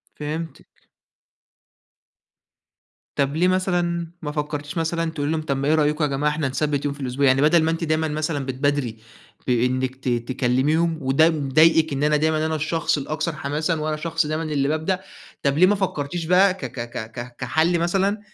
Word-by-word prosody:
فهمتِك. 155 +2 -7 2.3
طَب 140 +2 0
ليه 180 +2 +3
مثلًا 175 -2 0
ما 150 - -4
فكّرتيش 150 0 -4
مثلًا 165 0 -1
تقولي 145 -2 -2
لهم، 160 -1 -1
طَب 140 -3 -1
ما 140 +2 -1
إيه 155 - +4
رأيكم 150 0 +2
يا - - +1
جماعة 145 +2 0
إحنا 150 -2 -1
نثبِّت 145 +1 -1
يوم 145 - -1
في 145 - -14
الأسبوع؟ 135 +1 0
يعني 135 +1 +4
بَدَل 160 +2 +5
ما 160 - +2
أنتِ 165 +1 -2
دايمًا 155 0 0
مثلًا 150 -2 -2
بتبادري 130 -3 -1 0.5
بإنِّك 130 +1 +1
ت 130 - -6
تكلّميهم 130 +7 +1
وده 135 +5 +4
مضايقِك، 155 +1 +3
إن 140 - -2
أنا 150 0 +3
دايمًا 155 +1 +1
أنا 160 - -1
الشخص 160 0 0
الأكثر 155 +3 -3
حماسًا 150 +4 -1
وأنا 155 0 -1
شخص 165 0 -1
دايمًا 155 +2 -2
اللي 145 -3 0
بابدأ، 160 +5 -1 0.4
طَب 140 +1 +1
ليه 185 - +7
ما 205 - +3
فكّرتيش 175 -4 -2
بقى 185 +3 +4
ك - - -9
ك 120 - -8
ك 110 -2 -6
ك 120 +1 -8
كحَل 160 +7 +1
مثلًا 195 +4 +1
155 Hz, 180 wpm, -23 LUFS, 140-165 Hz, 2.3 s, ليه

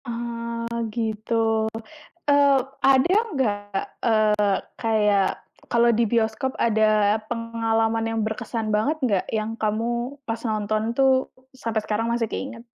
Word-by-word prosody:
Eee, 235 -1 -4 0.3
gitu. 220 0 -3 1.0
Eee, 285 -1 +5 0.2
ada 270 +7 +5 0.2
nggak, 245 -7 +1 0.5
eee, 230 -2 +3 0.7
kayak 210 -3 +3 0.4
kalau 235 0 +4
di 235 - +2
bioskop 230 +3 0
ada 215 -1 +3
pengalaman 225 -1 0
yang 225 0 -1
berkesan 220 0 -3
banget 270 +9 +1
nggak, 205 -7 +1
yang 215 0 -1
kamu 235 +5 -2
pas 225 0 -3
nonton 215 0 -1
tuh 265 0 +3 0.2
sampai 230 -4 -2
sekarang 220 +2 -1
masih 235 -1 0
keinget? 245 -3 -6
230 Hz, 115 wpm, -24 LUFS, 220-240 Hz, 1.0 s, Eee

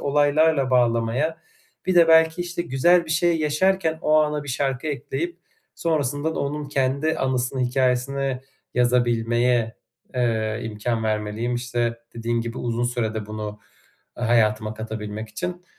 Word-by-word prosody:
olaylarla 145 -1 +3
bağlamaya, 120 +6 +1 0.5
bir 185 - +2
de 170 -1 +6
belki, 160 +1 +5
işte, 175 0 -4
güzel 170 +4 +3
bir 160 - -8
şey 170 +1 +2
yaşarken 160 +2 +1
o 155 0 +4
ana 150 -1 0
bir - - -10
şarkı 135 +2 -1
ekleyip 150 +5 -3 0.4
sonrasında 150 -1 -1
da - - -4
onun 145 0 -3
kendi 140 +3 0
anısını, 130 0 -1
hikâyesini 130 +1 0 0.3
yazabilmeye, 120 -1 +2 0.4
eee, 110 -3 0
imkân 110 +1 -2
vermeliyim, 110 +3 -1
işte, 120 -1 -1 0.2
dediğin 115 0 -1
gibi 115 +1 -5
uzun 120 0 -1
sürede 110 -3 -2
bunu 105 0 -6 0.6
hayatıma 110 -2 +1
katabilmek 110 0 -6
için. 175 +11 -5
125 Hz, 130 wpm, -23 LUFS, 115-150 Hz, 0.6 s, de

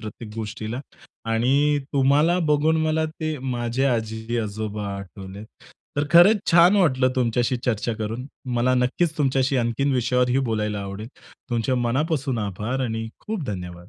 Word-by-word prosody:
प्रत्येक 105 0 -9
गोष्टीला 110 +2 -5 0.5
आणि 140 +6 +2
तुम्हाला 145 +6 +3
बघून 150 +2 +3
मला 160 0 +1 0.2
ते 155 -1 -2 0.2
माझे 120 +2 -1
आजी-आजोबा 110 -3 -2
आठवले. 100 +1 -9 0.5
तर 145 - +1
खरंच 185 +5 +7
छान 175 +4 +6
वाटलं 130 -9 +3
तुमच्याशी 120 0 +1
चर्चा 115 -1 0
करून. 115 +4 -4 0.3
मला 130 +2 +2
नक्कीच 140 +6 0
तुमच्याशी 135 -1 +1
आणखीन 125 +4 0
विषयावरही 125 +1 +2
बोलायला 105 -2 -1
आवडेल. 100 +3 -6 0.4
तुमचे 120 +2 0
मनापासून 135 +2 0
आभार 105 +5 -3
आणि 115 -1 -3 0.2
खूप 215 -6 -3
धन्यवाद. 90 -3 -6
125 Hz, 130 wpm, -23 LUFS, 110-140 Hz, 0.5 s, खरंच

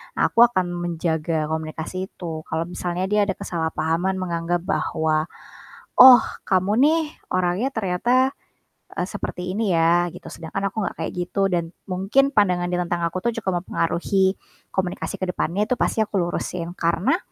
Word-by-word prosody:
Aku 230 - +4
akan 185 -7 -1
menjaga 165 -2 -1
komunikasi 160 +4 -4
itu 160 -5 -7
kalau 160 - -1
misalnya 180 +1 -3
dia 210 0 +4
ada 195 - -1
kesalahpahaman 165 +2 -1
menganggap 170 -1 -2
bahwa, 155 -4 0 0.7
"Oh 250 -3 +10 0.2
kamu 190 +1 +2
nih 320 +3 +4 0.3
orangnya 185 +7 +1
ternyata, 240 +7 +1 0.6
eee, - - -2
seperti 180 -3 -5
ini 205 -3 0
ya." 170 +1 +3
Gitu - - -11
sedangkan 165 +4 -5
aku 215 +2 -3
nggak - - -5
kayak - - -3
gitu 185 +3 0
dan 170 -2 -1 0.2
mungkin 200 +10 +2
pandangan 180 -4 +3
dia 180 - 0
tentang 175 0 -2
aku 170 +2 -3
tuh 235 - +2
cukup 190 -3 0
mempengaruhi 190 +3 0 0.3
komunikasi 185 -2 -3
ke 185 - -2
depannya 185 +4 -1
itu 250 - +1
pasti - - 0
aku 210 - -19
lurusin 175 0 -3
karena 170 - +1
180 Hz, 155 wpm, -23 LUFS, 170-195 Hz, 0.7 s, Oh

